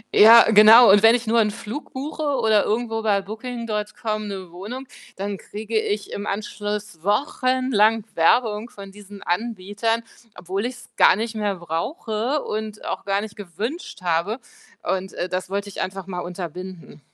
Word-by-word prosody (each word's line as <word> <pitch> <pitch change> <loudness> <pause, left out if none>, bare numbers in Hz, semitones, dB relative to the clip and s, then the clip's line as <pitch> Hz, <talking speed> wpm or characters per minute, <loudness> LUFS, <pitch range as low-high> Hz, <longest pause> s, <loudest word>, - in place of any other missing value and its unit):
Ja, 230 +2 +9
genau. 220 +1 +9
Und 205 - +6
wenn 225 +2 +7
ich 245 - -3
nur 230 +1 +3
'n 210 -2 +3
Flug 215 +8 -7
buche 295 +3 -5
oder 220 -4 +3
irgendwo 225 0 -1
bei 200 -3 +1
Booking.com 215 -1 -4
'ne 190 -4 -7
Wohnung, 215 +9 -7 0.3
dann 200 +1 -4
kriege 220 +4 -7
ich 205 -1 -3
im 205 +1 -5
Anschluss 205 -3 -4
wochenlang 225 -1 +2
Werbung 215 +6 +2
von 195 -1 -11
diesen 205 0 -12
Anbietern, 220 +3 -1 0.3
obwohl 190 +6 -3
ich's 245 -1 -10
gar - - +6
nicht 225 +2 -3
mehr 205 -2 -1
brauche 220 - -2
und 215 0 -5
auch - - -4
gar 200 0 0
nicht 210 -1 -8
gewünscht 205 - -6
habe 175 +6 0 0.5
und, 190 0 -2
äh, 180 - -3
das 185 0 -3
wollte 200 +1 -3
ich - - -6
einfach 190 0 -4
mal 180 -2 -5
unterbinden. 180 -1 -7
210 Hz, 160 wpm, -23 LUFS, 195-225 Hz, 0.5 s, Ja